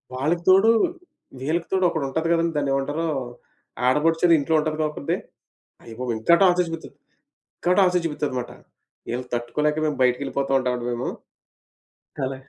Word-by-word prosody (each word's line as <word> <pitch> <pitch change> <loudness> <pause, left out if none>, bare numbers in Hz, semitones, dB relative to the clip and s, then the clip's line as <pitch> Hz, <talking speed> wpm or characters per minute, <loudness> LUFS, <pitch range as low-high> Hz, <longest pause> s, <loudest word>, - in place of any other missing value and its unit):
వాళ్ళకి 155 +7 -1
తోడు 195 +4 +6 0.7
వీళ్ళకి 165 +5 -1
తోడు 190 -1 +2
ఒకటుంటది 160 +2 -2
గదండి! 165 -1 +1
దాన్నేమంటారు? 140 +3 -1 0.8
ఆడపడుచని 165 +5 +3
ఇంట్లో 160 +3 0
ఉంటదిగా 155 0 -1
ఒకత్తి. 150 - -3 0.7
అయ్యబాబోయ్! 120 +1 -4
ఇంకా 170 +10 +5
టార్చర్ 180 -1 +4
చుపిస్తది, 165 -1 -7 0.6
ఇంకా 180 - 0
టార్చర్ 180 -2 +3
చుపిస్తది 150 -4 -2
మాట. 120 - -6 0.6
ఈళ్ళని 125 +1 -4
తట్టుకోలేక 150 +6 -1
మేము 150 - -2
బయటికెళ్ళిపోతా 135 +2 0
ఉంటామండి 125 -2 -2
మేము. 120 +1 -2 1.2
అలా 130 0 -4
150 Hz, 125 wpm, -23 LUFS, 130-165 Hz, 1.2 s, తోడు